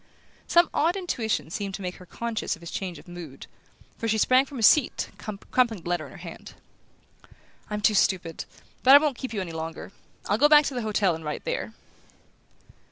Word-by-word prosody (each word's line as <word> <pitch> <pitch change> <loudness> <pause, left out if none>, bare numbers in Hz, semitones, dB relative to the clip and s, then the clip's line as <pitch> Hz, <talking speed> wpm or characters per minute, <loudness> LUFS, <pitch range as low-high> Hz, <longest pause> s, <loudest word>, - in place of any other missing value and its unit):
Some 345 0 +5
odd 330 +4 +2
intuition 230 - -2
seemed 195 +1 -4
to - - -8
make 180 0 -5
her 180 - -14
conscious 230 +2 -3
of 165 - -18
his 170 - -7
change 185 -3 -4
of - - -15
mood, 170 -6 -9 0.5
for 230 - -2
she 220 0 +1
sprang 255 +5 +4
from 275 - -9
her 230 - -3
seat, 270 +4 +4
crumpling 220 -1 -1
the - - -8
letter 175 -3 -1
in - - -14
her - - -12
hand. 170 -1 -10 1.1
"I'm 210 0 -3
too 215 - +4
stupid; 180 -4 0 0.4
but 265 +2 +8
I - - +12
won't 290 -2 +1
keep 260 - -5
you 210 -4 -2
any 175 -3 -5
longer. 160 +2 -6 0.3
I'll 205 +2 0
go 295 +2 +6
back 300 -1 +7
to 280 - -2
the 245 - -2
hotel 210 -4 +1
and 160 0 -7
write 150 - -4
there." - - -4
210 Hz, 205 wpm, -26 LUFS, 175-260 Hz, 1.1 s, I